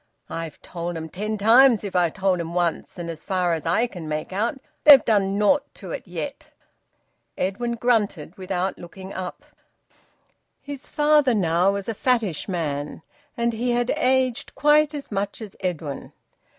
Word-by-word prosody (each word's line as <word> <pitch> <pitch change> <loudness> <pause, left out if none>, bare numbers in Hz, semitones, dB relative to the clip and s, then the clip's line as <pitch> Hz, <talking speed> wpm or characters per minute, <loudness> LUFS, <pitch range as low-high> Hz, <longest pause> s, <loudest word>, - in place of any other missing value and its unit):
I've 165 -3 -5
told 170 -1 -5
'em 160 0 -6
ten 215 +5 -3
times 230 +2 +6
if 200 -2 -6
I've 175 -3 +2
told 190 -2 +1
'em 170 0 -5
once, 175 -2 -1
but 175 - -6
as 165 -2 -6
far 180 -3 0
as 160 0 -3
I 200 +8 +3
can 175 -9 -8
make 155 +4 -4
out, 230 +8 -1 0.2
they've 290 -3 +9
done 200 -3 +2
naught 210 +8 +4
to - - -9
it - - -6
yet." - - -6 0.9
Edwin 235 +6 -1
grunted 210 -9 0
without 190 -1 -3
looking 190 +2 -10
up. 185 -1 -6 1.1
His 285 -2 -8
father 295 -4 +3
was - - +1
now 175 +3 +2
a 200 - -3
fattish 220 - 0
man, 150 -4 -3 0.3
and 235 0 +1
he 240 +2 -1
had 240 +1 +1
aged 260 0 +1
quite 300 0 +4
as 285 -4 -7
much 200 0 -2
as 215 -4 -9
Edwin. 165 -7 -4
195 Hz, 165 wpm, -23 LUFS, 175-240 Hz, 1.1 s, they've